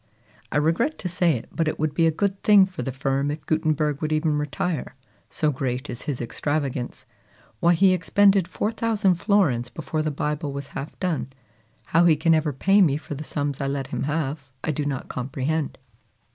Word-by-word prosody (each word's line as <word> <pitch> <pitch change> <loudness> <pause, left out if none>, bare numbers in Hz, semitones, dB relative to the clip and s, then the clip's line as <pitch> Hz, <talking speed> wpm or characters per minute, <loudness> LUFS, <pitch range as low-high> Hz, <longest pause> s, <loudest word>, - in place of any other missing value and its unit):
I - - +1
regret 165 - +1
to 185 - -4
say 175 -3 +2
it, 115 - -9
but 165 -2 -1
it - - -1
would 155 -1 -1
be 165 -1 +3
a - - +3
good 195 +4 -1
thing 205 -2 +7
for 190 -1 -7
the 135 - -3
firm 135 +1 -1
if 150 +2 -5
Gutenberg 155 -2 0
would 155 0 -1
even 155 0 +1
retire, 150 0 -3 0.3
so 155 -1 +1
great 130 0 -3
is 120 - -6
his 140 -4 -3
extravagance. 130 0 -3 0.5
Why, 170 +1 +4
he 190 +2 +5
expended 195 +1 +3
4,000 215 0 +1
florins 170 - +1
before 155 +1 -3
the 155 - 0
Bible 150 +1 -2
was 140 0 -6
half 140 +3 -7
done! 160 -8 -2 0.5
How 165 +2 +3
he 165 -2 +6
can 165 +2 +3
ever 155 -1 +2
pay 195 +9 +3
me 145 -6 +4
for 155 0 -7
the 145 +2 -6
sums 145 -2 -3
I 140 - 0
let 135 -1 -3
him - - -1
have, 145 -2 -2
I 160 - 0
do 150 -1 -2
not 140 -3 -3
comprehend." 135 +4 -2
155 Hz, 195 wpm, -24 LUFS, 140-175 Hz, 0.5 s, thing